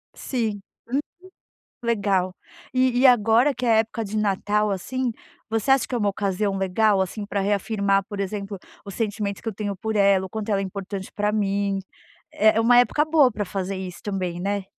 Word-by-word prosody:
Sim, 220 Hz, -6 st, -2 dB, 0.3 s
uhum, 265 Hz, +4 st, 0 dB, 0.8 s
legal. 195 Hz, -5 st, 0 dB, 0.4 s
E 255 Hz, -1 st, +2 dB
e 270 Hz, -, +4 dB
agora 240 Hz, +3 st, +4 dB
que 250 Hz, -, -4 dB
é 235 Hz, -, +3 dB
a -, -, +5 dB
época 225 Hz, +1 st, 0 dB
de 215 Hz, +1 st, -4 dB
Natal, 210 Hz, 0 st, +1 dB
assim, 250 Hz, +6 st, -2 dB, 0.4 s
você 225 Hz, +3 st, -1 dB
acha 270 Hz, -4 st, +3 dB
que -, -, -8 dB
é 245 Hz, -, +1 dB
uma 205 Hz, -2 st, +1 dB
ocasião 195 Hz, 0 st, -1 dB
legal 195 Hz, +2 st, +2 dB
assim, 205 Hz, +3 st, -3 dB
para 200 Hz, -1 st, -2 dB
reafirmar, 200 Hz, 0 st, +1 dB
por 205 Hz, -, -6 dB
exemplo, 200 Hz, 0 st, -4 dB, 0.3 s
os 200 Hz, -, -9 dB
sentimentos 205 Hz, -3 st, -2 dB
que -, -, -9 dB
eu -, -, -7 dB
tenho 205 Hz, 0 st, -3 dB
por 220 Hz, +3 st, -4 dB
ela, 195 Hz, -2 st, +4 dB
o -, -, -9 dB
quanto 220 Hz, +2 st, -5 dB
ela 200 Hz, -1 st, +2 dB
é -, -, -1 dB
importante 195 Hz, 0 st, -6 dB
para 210 Hz, 0 st, 0 dB
mim 200 Hz, -1 st, 0 dB, 0.5 s
é 215 Hz, +1 st, +3 dB
é 225 Hz, -, +4 dB
uma 245 Hz, +2 st, +5 dB
época 295 Hz, +5 st, +3 dB
boa 305 Hz, -5 st, +4 dB
pra 210 Hz, -1 st, -3 dB
fazer 195 Hz, +1 st, -3 dB
isso 185 Hz, -2 st, -7 dB
também, 185 Hz, -4 st, -3 dB
né. 200 Hz, 0 st, -2 dB
205 Hz, 200 wpm, -24 LUFS, 195-225 Hz, 0.8 s, a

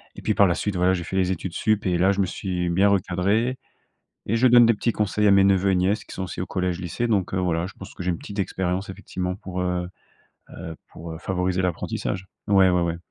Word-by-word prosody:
Et -, -, -9 dB
puis, 110 Hz, -, 0 dB
par 100 Hz, -1 st, +5 dB
la 85 Hz, -, +1 dB
suite, 105 Hz, -2 st, -2 dB
voilà, 90 Hz, +1 st, +3 dB
j'ai 90 Hz, -2 st, -2 dB
fait 95 Hz, -, -5 dB
les 95 Hz, -1 st, +2 dB
études 95 Hz, -1 st, -4 dB
supérieures 110 Hz, +1 st, 0 dB
et 90 Hz, -2 st, +1 dB
là, 95 Hz, +3 st, +4 dB
je 100 Hz, -, -2 dB
me 95 Hz, -, +3 dB
suis 90 Hz, -1 st, -3 dB
bien 95 Hz, +4 st, +3 dB
recadré 100 Hz, +6 st, +1 dB, 0.7 s
et 110 Hz, -, +1 dB
je 130 Hz, -, +5 dB
donne 120 Hz, -1 st, +7 dB
des 115 Hz, -, +5 dB
petits 115 Hz, +3 st, 0 dB
conseils 105 Hz, 0 st, +1 dB
à -, -, +6 dB
mes 100 Hz, 0 st, +6 dB
neveux 95 Hz, 0 st, +3 dB
et -, -, +2 dB
nièces, 95 Hz, +4 st, +1 dB
qui -, -, -11 dB
sont 95 Hz, -, -3 dB
aussi 90 Hz, -, -6 dB
au -, -, -2 dB
collège-lycée. 90 Hz, +4 st, -2 dB
Donc, 100 Hz, -5 st, 0 dB
heu, -, -, 0 dB
voilà, 85 Hz, -2 st, 0 dB
je 95 Hz, -, -11 dB
pense 95 Hz, -, -10 dB
que -, -, -9 dB
j'ai 90 Hz, -, 0 dB
une 85 Hz, -, -3 dB
petite 100 Hz, +4 st, -8 dB
expérience, 95 Hz, 0 st, -2 dB
effectivement, 90 Hz, -1 st, -4 dB
pour 90 Hz, -1 st, -5 dB
heu 90 Hz, -1 st, -1 dB, 0.6 s
heu, 80 Hz, -2 st, -8 dB, 0.2 s
pour, 80 Hz, 0 st, -8 dB
heu, -, -, -7 dB
favoriser 90 Hz, 0 st, -1 dB
l'apprentissage 90 Hz, +1 st, -3 dB, 0.2 s
ouais, 95 Hz, -2 st, +5 dB
ouais, 90 Hz, -1 st, +2 dB
ouais. 85 Hz, -1 st, -1 dB
95 Hz, 250 wpm, -24 LUFS, 90-100 Hz, 0.7 s, donne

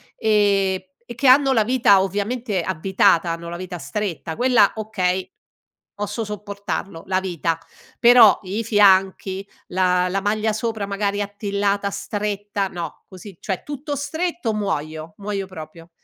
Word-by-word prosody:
ehm, 200 Hz, -3 st, +2 dB, 0.3 s
e 240 Hz, -, -7 dB
che 240 Hz, +4 st, 0 dB
hanno 270 Hz, +1 st, +6 dB
la 225 Hz, -4 st, +3 dB
vita 225 Hz, -5 st, +4 dB
ovviamente 205 Hz, +1 st, -2 dB
avvitata, 185 Hz, 0 st, +2 dB
hanno 170 Hz, 0 st, -5 dB
la 170 Hz, -, -5 dB
vita 180 Hz, 0 st, -6 dB
stretta, 165 Hz, +2 st, -4 dB
quella 245 Hz, -5 st, +4 dB
okay, 190 Hz, -4 st, -1 dB, 0.6 s
posso 205 Hz, +2 st, -4 dB
sopportarlo, 200 Hz, -4 st, -5 dB
la 185 Hz, 0 st, +1 dB
vita, 170 Hz, -3 st, -2 dB, 0.4 s
però 235 Hz, -4 st, +7 dB
i 200 Hz, +5 st, -3 dB
fianchi 195 Hz, -2 st, +3 dB, 0.2 s
la 180 Hz, 0 st, +2 dB
la 195 Hz, +2 st, -1 dB
maglia 215 Hz, +2 st, 0 dB
sopra 220 Hz, -1 st, -2 dB
magari 200 Hz, 0 st, -1 dB
attillata, 200 Hz, 0 st, -1 dB
stretta, 205 Hz, 0 st, -3 dB
no, 175 Hz, -2 st, -7 dB
così 190 Hz, +1 st, -11 dB
cioè 190 Hz, -3 st, -3 dB
tutto 290 Hz, +1 st, -5 dB
stretto 315 Hz, -3 st, -2 dB
muoio, 160 Hz, -6 st, -3 dB
muoio 200 Hz, -1 st, -4 dB
proprio. 165 Hz, -2 st, -11 dB
200 Hz, 135 wpm, -22 LUFS, 185-215 Hz, 0.6 s, però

